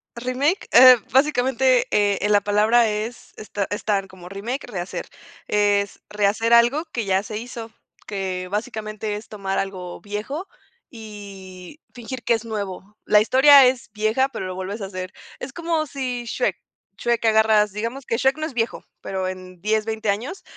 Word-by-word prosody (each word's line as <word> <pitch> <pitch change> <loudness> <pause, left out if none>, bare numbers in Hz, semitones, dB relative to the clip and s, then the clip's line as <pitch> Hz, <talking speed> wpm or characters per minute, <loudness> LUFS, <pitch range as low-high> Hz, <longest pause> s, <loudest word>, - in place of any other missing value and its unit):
Remake, 255 +9 -1
eh, 255 0 +10 0.2
básicamente, 260 -2 +3
eh 205 -1 +2
eh, 205 - 0
la 205 -1 +4
palabra 215 +3 +3
es 215 +3 -5
es 215 - -11
ta 200 -1 -1
es 205 - -4
tal 200 -2 0
como 180 -1 -13
remake, 230 +8 -4
rehacer, 180 -2 -5 0.4
es 205 -1 +1
rehacer 210 +3 +1
algo 240 +8 +4
que 230 -4 -3
ya 190 0 +2
se 215 0 -6
hizo, 230 -1 -7 0.4
que, 185 -3 -3
básicamente, 215 -1 -4
es 210 - -8
tomar 195 -2 -3
algo 185 -2 -5
viejo, 215 - -5 0.4
y 200 - -11
fingir 245 +1 -7
que 235 - +2
es 225 0 -2
nuevo. 205 -1 -6
La 210 - +5
historia 270 +3 +7
es 250 -4 -2
vieja, 220 +6 +1
pero 190 - -5
lo 185 - -5
vuelves 195 +3 -5
a - - -3
hacer, 185 0 -7 0.3
es 265 +1 -7
como 330 -1 -1
si 255 -4 -4
Shrek, - - -1 0.4
Shrek 235 -1 0
agarras, 220 -2 +4
digamos 230 +6 -4
que 230 - 0
Shrek 265 +3 +2
no 310 - -3
es - - -10
viejo, 225 0 -2 0.2
pero 190 -1 -3
en 185 -1 -8
10, 215 +1 +1
20 220 -1 -3
años, 240 - -3
215 Hz, 170 wpm, -22 LUFS, 200-245 Hz, 0.4 s, eh